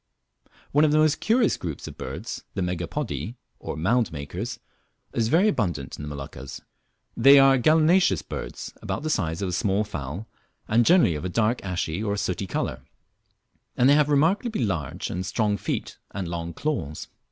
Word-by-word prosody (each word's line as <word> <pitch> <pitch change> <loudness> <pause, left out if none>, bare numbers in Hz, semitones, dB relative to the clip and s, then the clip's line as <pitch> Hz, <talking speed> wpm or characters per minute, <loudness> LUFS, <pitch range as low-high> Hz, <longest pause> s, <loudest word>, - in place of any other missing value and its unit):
One 145 +2 +4
of 155 - +4
the 155 - +4
most 155 0 +3
curious 230 0 +2
groups 80 -5 -6
of - - -8
birds, - - -6
the 95 - 0
Megapodii, 90 - -3 0.2
or - - -5
mound 115 +8 +1
makers, 90 - -5 0.5
is 115 - +1
very 170 - +4
abundant 85 - -1
in - - -9
the 75 - -6
Moluccas. 70 -2 -7 0.6
They 135 +4 +8
are 135 -1 +6
gallinaceous 160 +6 +4
birds, - - -6
about - - -3
the 155 - -1
size 85 - -1
of 95 - -1
a - - -3
small 100 +1 +1
fowl, 80 0 -6 0.4
and 115 +2 +3
generally 170 - +5
of 75 - -5
a 90 - -2
dark 115 +5 +1
ashy 90 -1 -2
or 100 -1 -1
sooty 95 0 -2
colour, 65 -6 -3 1.0
and 125 - +5
they 140 - +7
have 150 0 +4
remarkably 165 - +2
large 85 -9 -3
and 90 - -3
strong 105 +1 0
feet - - -4
and 95 -2 -4
long 85 0 -4
claws. 110 - -3
105 Hz, 175 wpm, -25 LUFS, 85-145 Hz, 1.0 s, They